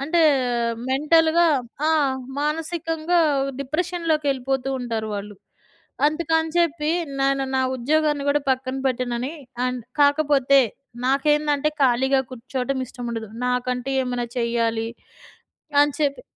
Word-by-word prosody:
అంటే 325 +4 +1 0.5
ఆహ్, 230 - -3
మెంటల్‌గా 320 +5 +4 0.4
ఆ! - - +3 0.5
మానసికంగా 325 +2 -1 0.4
డిప్రెషన్లోకేళ్ళిపోతూ 290 -4 -1
ఉంటారు 225 -3 -3
వాళ్ళు. 205 +1 -6 0.7
అందుకని 320 +1 0
చెప్పి 315 -2 +1 0.3
నేను 275 0 +2
నా - - +2 0.2
ఉద్యోగాన్ని 295 +3 +1
గూడా 290 +1 +3
పక్కన 260 0 -1
పెట్టనని 250 +2 -2 0.3
అండ్ 250 -1 -2 0.2
కాకపోతే 285 -2 +4 0.5
నాకేందంటే 295 +2 +2
ఖాళీగా 265 +2 +3
కూర్చోవడం 255 +2 -3
ఇష్టం 245 0 -9
ఉండదు. 225 -2 -5 0.2
నాకంటూ 250 0 -1
ఏమైనా 245 -1 -2
చెయ్యాలి. 230 -1 0 0.9
అని 290 - +1
చెప్పి 285 - 0
275 Hz, 105 wpm, -23 LUFS, 250-310 Hz, 0.9 s, మెంటల్‌గా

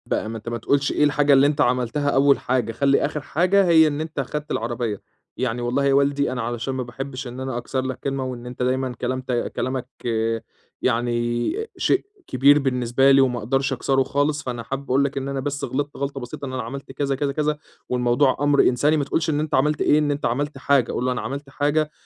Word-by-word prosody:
بقى 110 - -2
ما 115 - -5
أنت 110 +1 -7
ما 120 - -3
تقولش 140 +5 +1
إيه - - +1
الحاجة 145 0 +3
اللي 135 +1 +6
أنت 145 0 0
عملتها 125 +2 +1
أول 140 0 +4
حاجة، 125 -3 0
خلِّ 140 +3 +2
آخِر 150 - 0
حاجة 185 +7 +2
هي 160 -2 +6
إن 150 0 -2
أنت 155 -2 -5
خدت 150 +3 -4
العربية. 115 -2 -2 0.4
يعني 120 -1 -1
والله 125 +4 0
يا 140 - +3
والدي 140 0 +2
أنا 125 -1 -3
علشان 120 +3 -3
ما 130 -1 -2
باحبّش 130 +2 -6
إن 125 +1 -8
أنا 130 -2 -3
أكسر 130 +2 -2
لك 130 0 -4
كلمة 135 -1 -2
وإن 125 -2 -6
أنت 125 0 -5
دايمًا 130 0 0
كلام 130 +1 -1
ت 130 - -6 0.2
كلامك 130 0 -2 0.9
يعني 120 -1 0 0.3
شيء 385 - +1 0.2
كبير 140 +3 +5
بالنسبة 130 0 +2
لي 135 0 +6
وما 125 -2 +1
أقدرش 135 +4 0
أكسره 135 +1 +1
خالص، 145 +2 0
فأنا 120 -2 -4
حابب 135 +4 -4
أقول 135 +2 +3
لك 140 0 -2
إن 135 0 -2
أنا 140 -1 -2
بس 145 +2 -3
غلطت 145 +2 -3
غلطة 140 0 -3
بسيطة 125 +3 -7
إن 130 - -6
أنا 130 - -2
عملت 135 +4 -7
كذا، 135 0 -1
كذا، 140 +1 -1
كذا 150 +1 -1 0.3
والموضوع 125 +2 +2
أمْر 145 0 +4
إنساني 145 +5 +3
ما 145 - +1
تقولش 160 +3 -1
إن 150 -1 +1
أنت 155 0 -1
عملت 150 +3 +1
إيه، 150 - +4
إن 150 -1 +1
أنت 145 +1 -2
عملت 145 +4 -1
حاجة. 135 -2 +2
قُل - - -2
له 130 - +1
أنا 125 - -2
عملت 140 +1 -5
حاجة 150 +2 0
135 Hz, 225 wpm, -23 LUFS, 125-145 Hz, 0.9 s, اللي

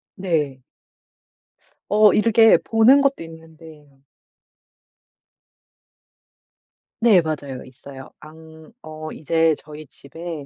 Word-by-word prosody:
네. 150 -9 -3 1.3
어 210 0 +4
이렇게 225 +1 +4
보는 230 +5 +3
것도 275 -9 -1
있는 160 -1 -15
데예요. 150 -4 -18 3.0
네 225 -6 +4
맞아요. 145 -5 -6
있어요. 135 +1 -13
안 160 +2 -16
어 155 0 -10
이제 160 +1 0
저희 150 0 -13
집에 160 +2 -10
160 Hz, 165 characters per minute, -20 LUFS, 150-190 Hz, 3.0 s, 어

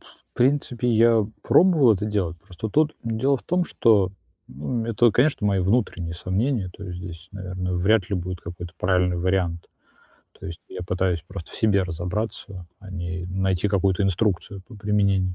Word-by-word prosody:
в - - -22
принципе, 125 -2 +1
я 115 -2 +4 0.2
пробовал 160 -10 +5
это 105 +2 -3
делать, 95 -5 -1
просто 90 +6 -7
тут 155 +7 +2
дело 115 +5 +1
в - - -13
том, 180 0 +1
что, 105 - +3 0.4
ну, 110 - -3
это, 115 +1 +4
конечно, 125 0 +2
мои 100 -2 +2
внутренние 95 -4 0
сомнения, 95 +4 -1
то 100 - -10
есть 90 -2 -6
здесь, 90 -1 -9
наверное, 95 -2 -4
вряд 95 +2 +2
ли 100 - -1
будет 90 0 -4
какой-то 85 0 -8
правильный 90 -1 +2
вариант. 85 -1 -1 0.7
То - - -8
есть 85 -2 -7
я 95 - -7
пытаюсь 90 -2 0
просто 85 - -8
в - - -11
себе 100 -3 +2
разобраться, 90 +1 -4
а 95 - -12
не 85 -1 -4
найти 95 +1 0
какую-то 95 -1 +1
инструкцию 95 0 0
по 120 - -13
применению. 100 -3 +1
95 Hz, 170 wpm, -24 LUFS, 90-110 Hz, 0.7 s, пробовал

